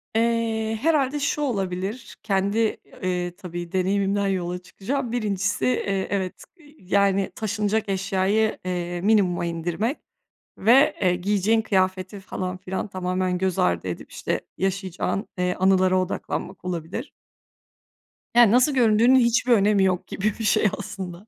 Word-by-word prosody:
Eee, 225 -1 0
herhâlde 295 -2 +2
şu 285 +1 -1
olabilir, 200 -2 -3
kendi, 200 +1 0 0.4
eee, 180 -1 -2
tabii, 175 -2 -7
deneyimimden 195 +2 +1
yola 180 -2 -1
çıkacağım. 240 +7 -4
Birincisi, 205 -4 -1
eee, 200 -6 0
evet, 190 -2 -3 0.4
yani, 195 +1 +1
taşınacak 215 0 -1
eşyayı, 195 +3 +1
eee, 175 -1 -3
minimuma 190 -4 +2
indirmek 175 - -2 0.6
ve, 270 +9 +5
eee, 180 -2 +3
giyeceğin 205 +4 +1
kıyafeti 190 -1 0
falan 185 -1 -5
filan 185 +3 -4
tamamen 185 -1 -1
göz 190 -1 -1
ardı 85 +1 +1
edip, 90 - -6
işte, - - -2 0.2
yaşayacağın, 190 +1 -2
eee, 180 0 0
anılara 185 0 +3
odaklanmak 185 0 -4
olabilir. 180 - -4 1.2
Ya, 240 -4 +7
nasıl 255 +5 +4
göründüğünün 235 0 +4
hiçbir 240 +1 +2
önemi 205 -2 +4
yok 185 -2 0
gibi 210 +1 -1
bir 225 - -3
şey, 210 0 +3
aslında. 190 0 -7
195 Hz, 125 wpm, -24 LUFS, 185-220 Hz, 1.2 s, Ya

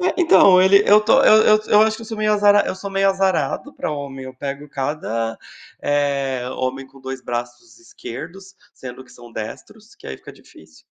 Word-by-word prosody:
É, 360 - +1
então 190 - +5
ele 200 +2 +5
eu 210 - +8
estou, 225 +6 +3
eu 215 0 +6
eu - - -4
eu 210 - +5
acho 220 0 +1
que 230 - -11
eu - - -10
sou 220 -1 -7
meio 215 0 +1
azara 205 0 +4
eu - - -3
sou 195 +1 -8
meio 195 0 +1
azarado 190 - -1
pra - - -5
homem, 135 -2 -7
eu 130 0 -10
pego 140 +2 -7
cada, 130 -5 -4 0.4
eh, 140 -3 -1
homem 130 +1 -3
com 135 0 -19
dois 130 0 -7
braços 120 - -7
esquerdos, 195 - -11 0.2
sendo 130 0 -10
que - - -20
são 120 -1 -15
destros, 210 - -10
que - - -15
aí 65 - -7
fica - - -14
difícil. 80 0 -20
150 Hz, 200 wpm, -20 LUFS, 130-205 Hz, 0.4 s, eu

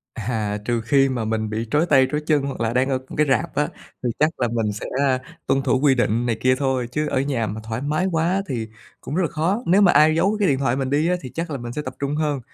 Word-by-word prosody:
À, 110 -2 -2
trừ 120 +1 0
khi 135 +4 +3
mà 125 -4 -2
mình 110 0 -1
bị 110 +2 -3
trói 150 +5 +2
tay 135 -5 +5
trói 150 - -1
chân, 150 -3 +3
hoặc 140 -2 -5
là 115 0 0
đang 130 +2 +2
ở 135 -1 +1
m - - -9
cái 150 - +3
rạp 160 +4 0
á, 150 - +1 0.3
thì 125 - 0
chắc 155 +1 +3
là 120 - +2
mình 110 -2 -1
sẽ, 105 - -6
a, 135 -2 +2 0.3
tuân 135 - +2
thủ 130 -1 +1
quy 140 -2 +4
định 120 -1 +1
này 115 -2 0
kia 130 0 +3
thôi, 130 -3 0
chứ 150 +2 -1
ở 130 - 0
nhà 135 -5 -1
mà 105 +2 -5
thoải 110 +1 -4
mái 150 +6 0
quá 170 +4 +1
thì 115 -5 -3 0.3
cũng - - -6
rất 185 - +1
là 170 - +1
khó. 175 +10 -1
Nếu 185 +4 +4
mà 195 -3 +6
ai 155 +2 +5
giấu 195 +6 +2
cái 205 - +2
điện 135 -2 +2
thoại 130 -2 0
mình 135 -1 -2
đi 150 +4 +2
á, 180 - +2
thì 130 - -8
chắc 165 0 -3
là 140 - -3
mình 120 -1 -6
sẽ 150 - -4
tập 130 -2 -6
trung 140 +1 -2
hơn, 150 -3 -1
135 Hz, 290 wpm, -22 LUFS, 120-150 Hz, 0.3 s, mà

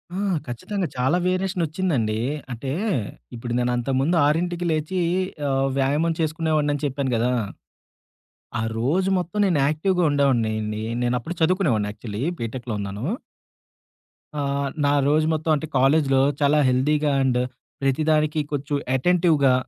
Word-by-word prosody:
ఆ! - - -3 0.3
ఖచ్చితంగా 180 - -3
చాలా 130 +8 +2
వేరియేషన్ 185 0 0
ఒచ్చిందండి. 145 - -1 0.3
అంటే, 125 +3 -5 0.7
ఇప్పుడు 120 +1 -5
నేనంతకుముందు 130 +6 +1
6కి 175 +3 0
లేచి 155 +4 -1 0.5
ఆహ్, 135 0 +1
వ్యాయామం 145 +5 +1
చేసుకునేవాడినిని 155 -2 0
చెప్పాను 135 -1 -1
గదా! 120 +2 +1 1.3
ఆ - - -1 0.2
రోజు 170 +11 +1
మొత్తం 180 +3 -4
నేను 170 -5 +2
యాక్టివ్‌గా 175 +4 +1
ఉండేవాడినిండి. 110 -6 +1 0.2
నేను 120 0 +1
అప్పుడు 165 +9 -6
చదువుకునేవాడిని 160 - +2
యాక్చువల్లీ 105 +1 -6 0.2
బీటెక్‌లో 115 0 -4
ఉన్నాను. 100 +3 -5 1.4
ఆహ్, 140 0 -1 0.2
నా 145 - +3
రోజు 155 +1 +3
మొత్తం 155 +1 0
అంటే 155 +2 -4
కాలేజీలో 135 0 +4 0.2
చాలా 145 +1 +4
హెల్తీగా 145 +4 +2
అండ్ 125 -2 +2 0.4
ప్రతిదానికి 155 +2 +2
కొంచెం 145 0 -1 0.2
అటెంటివ్‌గా 160 -3 +3
145 Hz, 120 wpm, -23 LUFS, 125-160 Hz, 1.4 s, కాలేజీలో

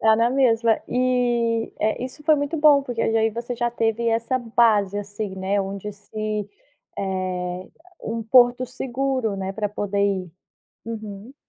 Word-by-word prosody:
Dá 220 0 +5
na 230 +2 +3
mesma 230 -4 +3
e 240 -2 +1
é, 215 +3 0
isso 260 +4 -7
foi 310 -1 +6
muito 285 +2 -2
bom 295 -2 +6
porque 240 -3 -3
aí - - +1 0.2
já 230 +2 -4
você 245 +1 -4
já 240 0 -1
teve 230 0 0
essa 230 +3 0
base, 220 -4 +2
assim, 205 -1 -5
né, 195 +2 0
onde 195 +1 -5
se 210 0 -4 0.5
eh, 185 -1 -3 0.3
um 225 +1 -3
porto 245 +2 +5
seguro, 255 -3 -2
né, 195 0 -3
para 210 +1 -2
poder 205 0 -3
ir. 190 -4 0 0.5
Uhum. 220 +2 -7
225 Hz, 155 wpm, -23 LUFS, 200-245 Hz, 0.5 s, foi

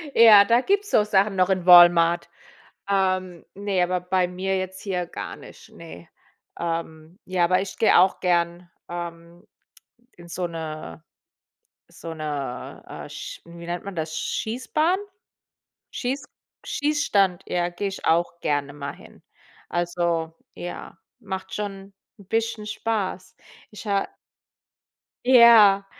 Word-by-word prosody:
Ja, 215 -3 +8
da 235 +4 +3
gibt's 405 +7 0
so 210 - +4
Sachen 200 -1 +2
noch 185 0 +2
in 185 -2 0
Walmart. 175 -1 +7 0.6
Ähm 185 -3 0
ne, 200 -2 -1
aber 180 +1 0
bei 180 0 +1
mir 190 +2 -2
jetzt 185 0 -5
hier 180 -3 -2
gar - - -7
nicht, - - -15
ne. 125 - -12 0.5
Ähm, 165 +1 -5
ja, 185 -1 0
aber 185 +2 +2
ich 195 - -7
gehe 220 - +4
auch 190 +2 +3
gern, 175 -1 0 0.2
ähm, 170 0 -8 0.7
in 175 0 -14
so 175 +1 -3
'ne 160 -2 -7 0.9
so 165 - -9
'ne, 145 -5 -5
äh, - - -8
sch - - -8
hm, 170 0 -13
wie 170 - -9
nennt 175 0 -4
man 200 -1 -7
das, 155 -1 -4
Schießbahn? 305 +10 -1 0.9
Schieß 270 +3 -3 0.4
Schießstand, 205 - +1
ja, 175 0 -1
gehe 195 +3 -3
ich 195 - -8
auch 170 +1 +1
gerne 145 -1 -1
mal 140 -1 -6
hin. - - -17 0.5
Also 170 -2 -1 0.2
ja, 175 -1 -8 0.2
macht 190 -3 -6
schon 200 -1 -6 0.3
'n 200 - -16
bisschen 225 -1 -2
Spaß. 210 -4 -3 0.3
Ich 210 +1 -11
ha 200 -1 0 1.2
Ja, 230 -6 +7
185 Hz, 135 wpm, -24 LUFS, 170-200 Hz, 1.2 s, Ja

